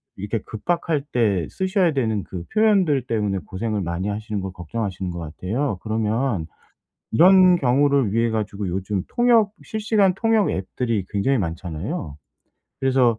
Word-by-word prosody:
이렇게 105 +4 -3
급박할 165 +6 -1
때 100 -9 +1
쓰셔야 190 -2 +1
되는 110 -7 0
그 90 -2 -7
표현들 195 - +3
때문에 105 -4 0
고생을 105 +2 -3
많이 85 +2 -3
하시는 105 0 -3
걸 95 0 -5
걱정하시는 95 +1 -4
것 85 - -6
같아요. 95 - -3
그러면 110 -2 -1 0.7
이런 185 +6 +7
경우를 140 - +2
위해 115 +1 +2
가지고 105 -3 -3
요즘 95 +2 -2
통역 235 -4 +3
실시간 215 -3 +1
통역 220 0 +2
앱들이 100 +2 -2
굉장히 110 +7 +1
많잖아요. 85 - -4 0.6
그래서 130 -4 +3
110 Hz, 330 characters per minute, -22 LUFS, 95-150 Hz, 0.7 s, 이런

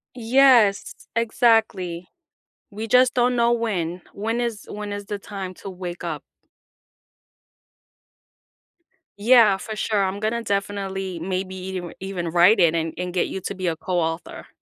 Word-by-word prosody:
Yes, 240 -4 +4 0.2
exactly. 220 -7 +1 0.6
We 215 +2 -5
just 250 +2 +4
don't 245 0 +2
know 235 0 +3
when, 185 -7 -2
when 225 +4 -2
is, 235 -3 -3
when 205 0 -6
is 205 0 -6
the 205 0 -4
time 195 -2 -7
to 195 - -9
wake 180 -1 -7
up? 155 -4 -4 3.0
Yeah, 220 -3 +6
for 220 +2 -7
sure, 210 -2 0
I'm 190 +1 -2
gonna 230 +2 -1
definitely 195 -2 -3
maybe 185 +2 -3
eve 185 -1 -5
even 185 -3 -4
write 175 +6 +5
it 170 -2 +4
and 165 -1 -1
and 180 0 -3
get 180 - 0
you 190 - -5
to 200 - -5
be 185 -1 -5
a 165 -2 0
co-author. 170 -2 -3
195 Hz, 145 wpm, -23 LUFS, 180-225 Hz, 3.0 s, Yeah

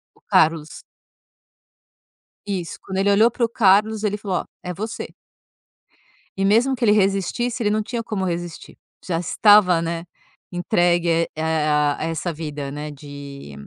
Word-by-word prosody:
O - - -27
Carlos. 160 -1 +1 1.6
Isso. 190 -5 -4
Quando 190 - -6
ele 200 +1 +3
olhou 215 +3 +5
para 240 0 0
o - - -5
Carlos, 215 -1 +3
ele 210 -1 0
falou: 195 -3 -2
"Ó, - - -13 0.2
é 180 - -4
você". 215 +5 -6 1.2
E 195 - +1
mesmo 235 +7 +3
que 245 - -1
ele 210 - +5
resistisse, 210 +4 +1
ele 210 - +2
não 215 +1 0
tinha 235 +2 -4
como 210 -4 -3
resistir. 175 -1 -5 0.3
Já 165 -3 -1
estava, 185 0 +5
né, 165 0 -3 0.5
entregue, 175 -1 +1
eh 160 -1 0
a 150 -1 +2
a - - -3
essa 165 +2 -2
vida, 150 -3 -5
né, 150 +1 -6
de 140 - -10
180 Hz, 155 wpm, -22 LUFS, 160-210 Hz, 1.6 s, olhou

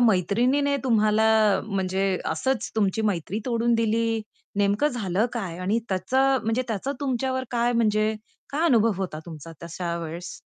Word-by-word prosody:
मैत्रिणीने 245 +7 +2
तुम्हाला 220 -2 +3 0.4
म्हणजे 190 -1 -1 0.3
असंच 235 +9 -1
तुमची 210 +1 +1
मैत्री 180 +2 -3
तोडून 235 -1 +1
दिली, 225 0 +1 0.3
नेमकं 205 +8 +2
झालं 215 -4 0
काय? 185 -8 -4
आणि 200 +5 0
त्याचं 260 +9 +2
म्हणजे 225 +3 +1
त्याचं 225 +6 -2
तुमच्यावर 260 -1 -1
काय 240 0 +1
म्हणजे 215 -2 +2 0.4
काय 305 +4 0
अनुभव 230 -6 +4
होता 155 -4 -4
तुमचा 165 0 -9
तशा 170 0 -4
वेळेस? 170 +2 -6
220 Hz, 140 wpm, -25 LUFS, 190-245 Hz, 0.4 s, अनुभव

